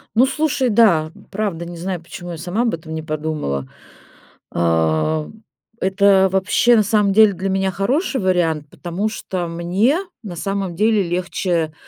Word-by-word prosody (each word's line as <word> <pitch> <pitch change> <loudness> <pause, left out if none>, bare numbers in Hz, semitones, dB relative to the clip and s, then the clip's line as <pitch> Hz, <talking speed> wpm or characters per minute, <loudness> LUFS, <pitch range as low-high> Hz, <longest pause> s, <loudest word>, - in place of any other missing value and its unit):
Ну, 245 +4 +6
слушай, 275 -3 0
да, 175 -8 +4 0.2
правда, 195 -5 -3
не 175 0 -8
знаю, 180 +1 -3
почему 175 +1 -9
я 165 - -6
сама 180 +8 -2
об 235 -5 +1
этом 160 -1 -9
не 160 - -3
подумала. 155 - -3 0.9
А, 85 - +1 0.5
это 190 0 +4
вообще, 195 +5 +3
на 215 - +4
самом 210 -2 +2
деле, 215 -1 +6
для 190 +2 -3
меня 190 0 0
хороший 260 - 0
вариант, 165 -5 +1
потому 185 +5 -3
что 185 -5 -4
мне, 180 - +1 0.3
на 180 -4 -7
самом 195 -1 -3
деле, 215 +2 +3
легче, 175 -2 -1
185 Hz, 150 wpm, -20 LUFS, 165-205 Hz, 0.9 s, Ну